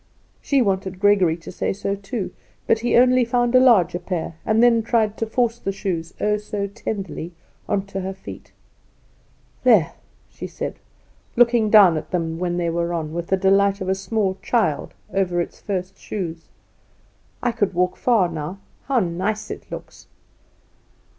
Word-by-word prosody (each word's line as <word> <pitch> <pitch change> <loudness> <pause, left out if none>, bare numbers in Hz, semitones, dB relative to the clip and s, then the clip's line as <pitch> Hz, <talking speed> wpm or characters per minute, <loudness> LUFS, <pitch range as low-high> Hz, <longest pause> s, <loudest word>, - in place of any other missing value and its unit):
She 275 -3 +2
wanted 190 -2 -1
Gregory 195 -5 +4
to 165 - -10
say - - -2
so 200 0 -2
too. 200 +1 -5 0.3
But 225 - +3
he 240 +1 +2
only 255 +1 +5
found 240 0 +1
a 255 - +7
larger 220 -9 +4
pair; 175 -2 -4
and 220 +2 +4
then 235 -1 +5
tried 220 -2 +1
to 225 - -2
force 235 0 0
the 195 - -2
shoes, 180 -4 -4
oh, 210 0 +1
so 210 -1 -4
tenderly, 195 -4 -5 0.4
on 195 -1 0
to 195 -1 -5
her 185 - -4
little 190 0 -8
feet. - - -10 1.1
"There," 205 -10 +5 0.4
she - - -8
said, - - -6 0.6
looking 235 -2 +4
down 200 -6 +7
at 155 0 -6
them 165 -2 -2
when 175 -1 -1
they 170 -1 0
were 170 +1 -1
on, 155 -2 -4
with 170 0 -4
the 190 - +2
delight 195 +1 +3
of 190 -1 -3
a - - +3
small 195 0 -1
child 220 -12 0 0.2
over 180 -3 +1
its 170 - -4
first 190 -2 -4
shoes, 170 -5 -5 1.0
"I 245 - +2
could 205 -5 -1
walk 180 +1 +1
far 225 -7 +3
now. 165 +2 -5 0.3
How 265 -4 +2
nice 190 +4 -2
it - - -8
looks!" - - -9
195 Hz, 170 wpm, -22 LUFS, 175-225 Hz, 1.1 s, a